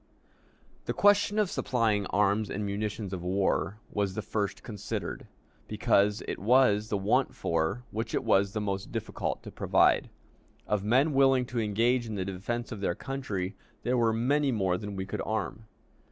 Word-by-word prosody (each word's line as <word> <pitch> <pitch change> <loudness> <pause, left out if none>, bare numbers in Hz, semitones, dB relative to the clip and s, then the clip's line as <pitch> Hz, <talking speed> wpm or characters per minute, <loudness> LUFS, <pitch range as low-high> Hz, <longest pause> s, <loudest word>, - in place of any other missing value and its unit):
The - - -1
question 205 +1 +4
of 210 -4 +2
supplying 110 -6 +1
arms 105 +1 +1
and 105 +1 -3
munitions 100 0 -3
of 90 - -4
war 95 +2 0
was 100 -2 -1
the 110 - -3
first 105 -2 -2
considered, 105 -4 -5 0.4
because 105 +2 +2
it - - -3
was 110 -1 +4
the 105 - 0
want 100 +1 +1
for 85 +8 -1
which 110 +2 -3
it - - 0
was 100 +1 +3
the 110 - -1
most 100 -1 -3
difficult - - -3
to - - -8
provide. - - +3 0.6
Of 105 -2 0
men 130 +8 +3
willing 135 -2 +4
to 125 -1 -3
engage 115 +3 +1
in 110 - -4
the 95 -2 -2
defense 110 +6 -4
of 105 -4 -6
their 85 -3 0
country, 110 -9 -4 0.3
there 125 - +1
were 115 -2 +3
many 135 +5 +1
more 95 -6 +1
than 105 +1 -5
we 95 0 -3
could 100 - -4
arm. 110 -1 -3
105 Hz, 170 wpm, -29 LUFS, 100-120 Hz, 0.6 s, question